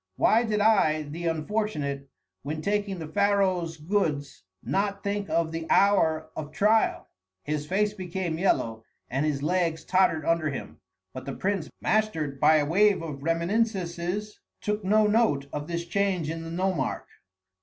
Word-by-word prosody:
Why 230 +2 +4
did 210 -2 0
I, 190 -8 +3
the 165 +4 -5
unfortunate, 155 -5 -2 0.3
when 155 +3 -5
taking 205 -1 -1
the 160 -2 -6
pharaoh's 185 -2 +1
goods, 155 -4 -1 0.2
not 200 - -1
think 200 -2 -2
of 160 0 +1
the 165 0 -5
hour 160 -6 +3
of 150 -1 -6
trial?" 210 +8 +2 0.4
His 150 0 -3
face 205 +3 +1
became 180 -4 -4
yellow, 115 -11 0 0.3
and 135 +4 0
his 140 -2 -1
legs 170 0 0
tottered 180 -5 +2
under 165 -2 +1
him. 135 - -7 0.3
But - - -7
the - - -5
prince, 195 -4 -1
mastered 160 -11 0
by 155 - +6
a 150 -1 +3
wave 195 +3 +3
of 145 -4 -6
reminiscences, 180 +3 -1 0.2
took 210 0 -2
no 215 +3 +4
note 210 -10 +2
of 145 0 -4
this 170 0 -3
change 180 -3 0
in 165 0 -5
the 165 - -7
nomarch. 175 -5 -1
170 Hz, 155 wpm, -27 LUFS, 155-200 Hz, 0.4 s, by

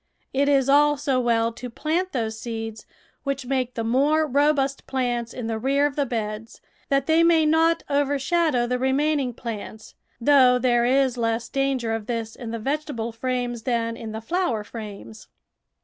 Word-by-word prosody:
It 280 +1 +2
is 275 -2 +3
also 285 -2 +3
well 230 -2 +1
to 250 +2 -7
plant 330 +9 -2
those 220 -4 -3
seeds 225 -2 -6 0.3
which 275 -2 -3
make 255 -1 -1
the 230 - -2
more 285 +7 +2
robust 280 -1 +1
plants 245 -3 -1
in 245 - -6
the 225 -1 -2
rear 275 +4 +2
of 290 -1 -1
the 285 -2 0
beds, 220 -1 -4 0.3
that 275 -1 +2
they 320 +2 +4
may 335 -2 +4
not 325 +2 +3
overshadow 285 -1 +1
the 250 +1 -1
remaining 270 +1 +1
plants, 220 -2 -7 0.3
though 255 -1 +5
there 240 -1 +2
is 260 0 +2
less 230 0 -1
danger 270 -4 0
of 220 -2 -4
this 230 -2 -3
in 240 -3 -7
the 230 - -3
vegetable 270 -2 -3
frames 245 0 -3
than 230 -1 -1
in 225 -1 -7
the 220 +1 -5
flower 260 - -1
frames. 215 0 -9
250 Hz, 165 wpm, -24 LUFS, 230-280 Hz, 0.3 s, though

